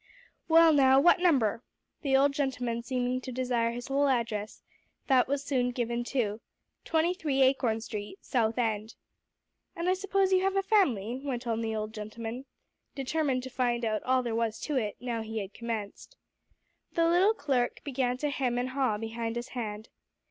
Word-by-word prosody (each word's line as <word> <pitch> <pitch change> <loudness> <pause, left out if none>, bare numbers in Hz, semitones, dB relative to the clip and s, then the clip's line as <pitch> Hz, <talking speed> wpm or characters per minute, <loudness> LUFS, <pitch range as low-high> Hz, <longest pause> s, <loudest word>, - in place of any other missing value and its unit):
"Well, 330 0 +7
now 265 -2 +6
what 345 +4 +5
number?" 265 - +2 0.4
The 270 -3 +3
old 280 +1 +3
gentleman 250 -4 -1
seeming 250 0 -1
to 255 - -6
desire 245 -2 0
his 240 +1 -6
whole 280 +1 +2
address, 230 -5 -2 0.4
that 260 -3 +4
was 280 +1 -1
soon 255 -4 0
given 240 -1 -2
too, 230 -4 -2 0.4
"23 320 -4 +1
Acorn 250 -4 +2
Street, 210 - -6
South 230 -3 0
End." 220 -2 -1 0.8
"And 340 +1 -3
I 370 - +4
suppose 385 0 +1
you 370 - +4
have 390 +1 +1
a 390 - +2
family?" 260 - +1
went 255 -3 -3
on 230 -1 -1
the 220 -1 -2
old 215 0 -4
gentleman, 225 +3 -6 0.5
determined 270 -1 -1
to 260 - -7
find 240 -2 0
out 215 -1 0
all 255 0 +1
there 235 -2 -2
was 225 -1 -1
to 300 - -3
it, 215 -5 -1
now 235 -1 -3
he 220 0 -6
had 200 -1 -4
commenced. 230 - -6 0.8
The 335 0 +3
little 370 +6 +4
clerk 265 - -1
began 255 -3 -1
to 295 +2 -1
hem 250 -3 -1
and 250 +1 -1
to - - -9
haw, 260 -6 +1
behind 225 +1 -4
his 240 +1 -4
hand. 215 -3 -5
250 Hz, 175 wpm, -29 LUFS, 230-280 Hz, 0.8 s, Well